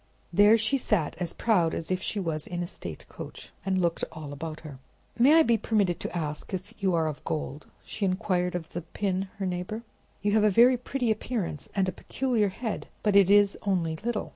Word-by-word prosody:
There 205 +4 +7
she 250 +5 +1
sat, 200 -10 0
as 175 -2 -1
proud 180 -8 +2
as 165 - -3
if 185 0 0
she 205 - -1
was 160 -5 -2
in 175 0 -3
a - - -2
state 85 - -8
coach, - - -9
and 190 0 +1
looked 170 -2 0
all 150 -3 -7
about 155 +2 -6
her. 145 -5 -10 0.4
"May 275 +6 +7
I 325 - +7
be 235 -5 +2
permitted 200 -6 +1
to - - -4
ask 150 +3 -3
if 185 +1 -7
you 190 -3 +2
are 165 -1 +2
of 155 -2 -4
gold?" 150 -1 -4 0.2
she 215 - -5
inquired 185 -2 0
of 165 -2 -4
the 175 - -5
pin, 190 +3 -2
her 195 - -2
neighbor. 185 +5 -3 0.4
"You 205 - +2
have 215 0 +4
a 215 - +6
very 240 +6 +6
pretty 250 -1 -1
appearance, 215 - -3
and 195 -2 +2
a - - 0
peculiar 230 +2 0
head, 220 +3 -4 0.2
but 210 -2 +2
it 195 -2 +7
is 205 0 +5
only 175 -6 0
little. 230 +3 -3
190 Hz, 215 wpm, -28 LUFS, 170-215 Hz, 0.4 s, There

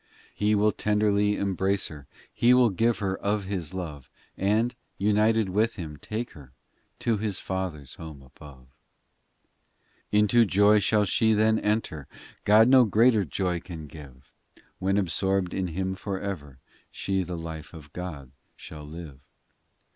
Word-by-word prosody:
xv - - -38 0.3
He 105 +1 +1
will 105 +1 +3
tenderly 105 -1 +1
embrace 95 0 0
her, 75 -3 -11 0.3
He 125 +1 +4
will 125 -3 +5
give 115 +5 +1
her 95 -2 -1
of 105 0 -1
His 95 -5 -4
love, 75 -7 -6 0.3
And, 110 +5 +1 0.2
united 105 +1 +2
with 110 +5 +1
Him, 80 -6 -7
take 110 +9 -5
her, 70 -4 -15 0.5
To 115 -2 +1
His 105 -2 -2
Father 95 -5 -4
s 70 -1 -12
home 80 -5 -10
above. 65 0 -15
XVI 65 +9 -9
Into 110 +3 +5
joy 105 +2 +5
shall 105 0 +2
she 110 +3 +2
then 110 +1 +3
enter: 105 - -1 0.4
God 110 +2 +6
no 130 -1 +7
greater 110 0 +4
joy 90 +2 -1
can 85 -3 -9
give; 70 -4 -13 0.5
When 95 +1 +1
absorbed 95 0 0
in 95 -1 -1
Him 95 +3 -2
for 95 0 -4
ever 75 -10 -6 0.3
She 95 -1 -2
the 90 -1 -5
life 80 -1 -7
of 75 -4 -13
God 75 -8 -7 0.3
shall 75 -1 -10
live. 75 -3 -10
95 Hz, 155 wpm, -26 LUFS, 80-105 Hz, 0.5 s, no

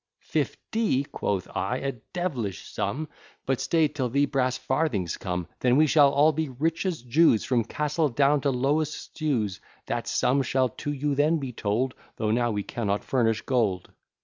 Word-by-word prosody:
"Fifty!" 220 - 0
quoth 100 -8 -2
I, 125 - -1
"a 135 +1 -2 0.2
devilish 130 - -3
sum; 155 +3 -2 0.4
But 135 -1 0
stay 160 -2 +3
till 140 -4 -3
the 140 +4 +3
brass 130 -2 0
farthings 105 - -1
come, 90 -1 -3
Then 125 +1 +3
we 155 - +6
shall 145 -1 +6
all 145 +3 +5
be 155 -1 -2
rich 160 +8 -1
as 165 -9 -3
Jews, 125 -2 +4
From 125 -3 +2
Castle 150 +6 0
down 140 +3 +3
to 140 - +1
lowest 140 +4 +1
stews; 115 - -2 0.3
That - - -3
sum 135 +2 +2
shall 130 0 +1
to 145 - -5
you 145 0 -1
then 150 +4 +3
be 135 -4 -4
told, 115 +5 -1 0.2
Though 110 -1 -1
now 120 +1 +2
we 105 -2 -2
cannot 105 -3 -2
furnish 115 -4 +1
gold." 110 -8 0
135 Hz, 175 wpm, -26 LUFS, 115-150 Hz, 0.4 s, we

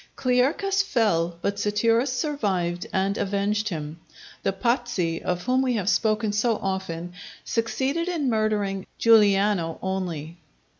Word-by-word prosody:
Clearchus 280 +11 +2
fell, 175 - +1
but 200 0 -1
Satirus 230 +5 +2
survived 195 - -1
and 195 +1 0
avenged 205 +2 0
him. 155 -2 -5 0.4
The - - +1
Pazzi, 200 -6 -1
of 180 0 -2
whom 255 +1 +2
we 255 -2 +1
have 205 -4 0
spoken 215 0 +1
so 225 +2 +2
often, 180 -3 -4 0.3
succeeded 265 +9 -1
in 330 -6 -1
murdering 210 -4 0
Giuliano 205 -6 +4
only. 175 -4 -4
210 Hz, 120 wpm, -25 LUFS, 185-240 Hz, 0.4 s, Giuliano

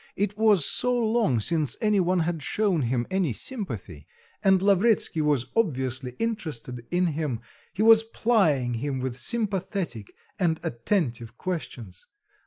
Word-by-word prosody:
It 205 +1 -1
was 210 -7 +4
so 250 0 +1
long 220 - +1
since 150 +2 +1
any 210 -2 +2
one 180 0 +2
had 165 -1 -2
shown 195 +1 0
him 120 -1 0
any 185 -9 0
sympathy, 110 - -6 0.4
and 190 -2 +5
Lavretsky 200 -3 +3
was 145 -5 +1
obviously 130 - -1
interested 145 - -4
in 180 +1 +1
him, 150 -7 -2 0.3
he 210 - -1
was 225 0 +8
plying 195 - +1
him 130 +3 -3
with 130 -1 -3
sympathetic 190 - -3 0.3
and 165 -4 +1
attentive 120 - -2
questions. 125 - -6
165 Hz, 135 wpm, -26 LUFS, 125-205 Hz, 0.4 s, was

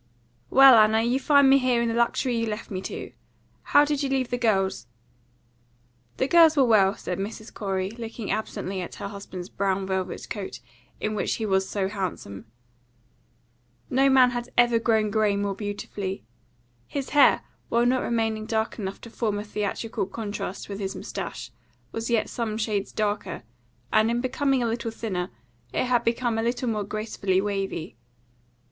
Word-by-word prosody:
"Well, 265 -3 +8
Anna, 220 +1 +4
you 245 +3 +1
find 280 0 +5
me 270 +1 +6
here 250 -2 +2
in 235 - +1
the 230 - 0
luxury 235 +2 +1
you 230 0 0
left 215 +1 -5
me 185 -1 -3
to. - - -6 0.5
How 290 +1 +5
did 295 -1 -1
you 275 - -1
leave 265 -2 0
the 245 - 0
girls?" 195 - +1 1.3
"The 260 - +1
girls 325 -1 +6
were 270 - +6
well," 205 -4 +4
said 180 - -5
Mrs. 215 +3 -6
Corey, 190 -2 -2
looking 225 -2 -6
absently 195 -3 -3
at 175 - -7
her - - -5
husband's 195 -3 -8
brown 195 -1 -1
velvet 190 -1 -3
coat, 205 -4 -5 0.4
in 215 - -2
which 210 - -1
he 225 - -3
was 190 -2 +1
so 195 -2 -1
handsome. 185 - -5 1.5
No 270 +2 +4
man 260 -2 +6
had 240 0 -4
ever 240 -1 +5
grown 220 -2 +2
grey 210 -1 +2
more 200 0 -1
beautifully. 200 -1 -5 0.6
His 280 -2 -4
hair, 290 -1 +5 0.3
while 235 +1 +2
not 255 +1 +2
remaining 225 -2 -1
dark 220 +1 -1
enough 195 -1 -4
to 230 - -10
form 215 -3 -1
a 205 - -3
theatrical 210 0 -3
contrast 205 -3 -5
with 200 0 -6
his 195 -1 -3
moustache, - - -6 0.4
was 225 +1 -4
yet 230 -2 +2
some 220 -3 -3
shades 210 -3 -1
darker, 210 - -2 0.5
and, 220 +1 +4
in 235 +1 0
becoming 265 +1 +1
a - - +1
little 230 0 -2
thinner, 195 -6 -3 0.4
it - - 0
had 245 -1 +2
become 235 -1 0
a - - +1
little 240 +1 -1
more 215 -2 -1
gracefully 200 -2 -1
wavy. 195 - -3
220 Hz, 170 wpm, -25 LUFS, 200-240 Hz, 1.5 s, Well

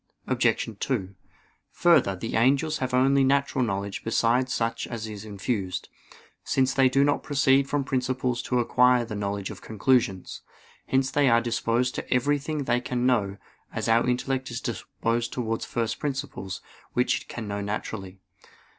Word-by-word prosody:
Obj. - - +1
2: 100 -8 -2 0.6
Further, 170 - +4
the 115 +5 -4
angels 140 +6 +2
have 130 -1 -2
only 135 +2 +4
natural 140 -1 +2
knowledge 100 -2 -3
besides 120 +3 +2
such 115 -1 -1
as 115 -2 -5
is 105 -1 -7
infused: 100 -2 -3 0.5
since 135 0 +1
they 135 -1 +4
do 135 +2 +3
not 145 0 +2
proceed 135 -1 +3
from 145 -1 0
principles 130 -2 -1
to 125 - -1
acquire 125 0 +4
the 115 - -7
knowledge 100 -1 -3
of - - -10
conclusions. 110 -3 0 0.5
Hence 130 0 +1
they 145 -2 +3
are 115 0 +5
disposed 120 +1 0
to - - -6
everything 145 +3 +1
they 125 -2 +1
can 125 -1 -2
know, 105 -6 +1 0.3
as - - -3
our 115 +2 +3
intellect 130 +1 -1
is 120 0 -4
disposed 115 -1 -2
towards 115 -2 -2
first 115 -1 -2
principles, 135 -9 -4 0.3
which 125 - +1
it - - -15
can 115 -3 -6
know 100 0 -3
naturally. 100 -2 -5
125 Hz, 155 wpm, -26 LUFS, 110-135 Hz, 0.6 s, are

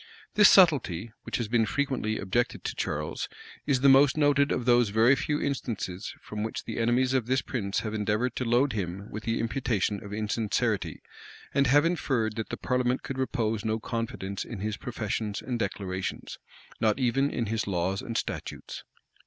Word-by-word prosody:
[] - - -25
This 210 -1 +8
subtlety, 120 - +4
which - - -2
has 120 - -2
been 115 0 +2
frequently 130 -6 -1
objected 105 +5 -1
to - - -2
Charles, - - -3 0.4
is 130 -3 +2
the 140 - +5
most 135 +1 +6
noted 145 -1 +3
of 125 - -1
those 120 -3 +4
very 115 +6 +5
few 150 +3 -1
instances 110 -8 -3
from 105 0 -5
which 110 +1 -3
the - - -5
enemies 125 +3 +2
of 125 -4 +1
this 130 +1 +1
prince 105 -5 -2
have 110 -1 -4
endeavored 110 +3 0
to - - 0
load 125 +3 +2
him 100 0 -4
with 105 +1 -6
the 115 0 0
imputation 110 -3 -1
of 100 - -9
insincerity; 110 0 -1 0.5
and 140 -1 +3
have 145 +4 +5
inferred 130 -10 0
that 110 -3 -3
the - - -4
parliament 125 0 0
could 135 -1 -5
repose 115 -5 -1
no 110 0 0
confidence 110 -4 -4
in 115 -5 -7
his 105 0 -2
professions 110 -3 -3
and 125 -2 -3
declarations, 95 -2 -4 0.4
not 110 0 +2
even 135 +2 +2
in 120 - -2
his 110 0 -2
laws 95 +1 -1
and 120 -3 -4
statutes. - - -5
115 Hz, 180 wpm, -28 LUFS, 105-130 Hz, 0.5 s, This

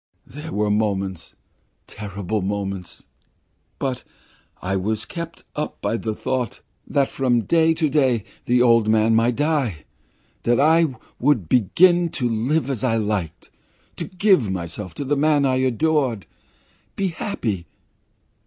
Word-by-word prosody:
There 150 +4 -9
were 105 0 0
moments 100 -4 -1 0.5
terrible 100 0 -4
moments 95 -2 -4 0.7
but 130 -2 -3 0.6
I 95 +2 -2
was 105 +3 -1
kept 170 -1 -7
up 150 - -4
by 105 +3 -1
the 110 -1 -3
thought 125 -1 -3 0.3
that 140 -1 +2
from 125 -3 +1
day 165 +6 +3
to 160 -1 +1
day 130 -6 +2 0.2
the 125 0 +3
old 115 -3 +4
man 110 +1 +4
might 115 +2 +3
die, 145 - 0 0.6
that 120 - +2
then - - 0
I 160 -1 +4 0.2
would 120 - +2
begin 170 - +4
to 125 - 0
live 120 +8 0
as 135 -5 -3
I 120 -3 +2
liked, 105 -7 -2 0.5
to - - -3
give 185 - +2
myself 90 0 -5
to 140 - -4
the 145 +2 +1
man 145 0 +3
I 130 -1 +2
adore 130 0 +1 0.8
be 195 -1 0
happy. 110 - -3
120 Hz, 140 wpm, -22 LUFS, 105-150 Hz, 0.8 s, old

